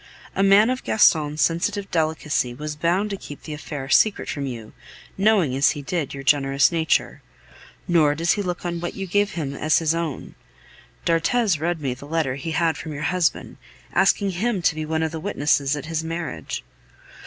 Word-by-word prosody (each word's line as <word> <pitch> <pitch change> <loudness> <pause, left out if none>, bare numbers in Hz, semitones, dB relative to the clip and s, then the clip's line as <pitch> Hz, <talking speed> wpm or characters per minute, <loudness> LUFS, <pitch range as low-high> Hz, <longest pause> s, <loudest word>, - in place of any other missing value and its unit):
A - - +1
man 200 +4 +5
of 255 - -3
Gaston's 155 -7 +3
sensitive 195 +4 -1
delicacy 155 -6 0
was 150 +2 -5
bound 175 +7 0
to 200 - -3
keep 145 -5 -10
the 155 - -6
affair 145 -2 -6
secret 210 +9 +3
from 140 -2 -3
you, 115 -4 -7 0.4
knowing 195 -9 +3
as 135 +2 +4
he 145 - -6
did, 165 -2 -2
your 135 0 -7
generous 135 0 +3
nature. 160 -2 0 0.7
Nor 155 -4 +3
does 165 +2 +1
he 205 - +1
look 180 -2 -4
on 170 -1 -2
what 175 - -5
you 195 - -4
give 205 +2 +1
him 145 -5 -3
as 155 +2 +2
his 160 -1 +1
own. 165 -4 -4 0.7
D'Arthez 175 +2 +2
read 170 0 -1
me 135 -3 -1
the 135 +3 -11
letter 155 -4 0
he 140 +4 -5
had 160 0 +1
from 155 - -6
your 145 - -5
husband, 180 -3 -1 0.4
asking 200 -2 +3
him 195 +1 -1
to 165 - +3
be 155 0 -5
one 160 0 0
of 160 - -1
the 160 - -5
witnesses 145 -5 +1
at 145 - -6
his 160 0 -2
marriage. 165 - -5
160 Hz, 190 wpm, -23 LUFS, 145-180 Hz, 0.7 s, man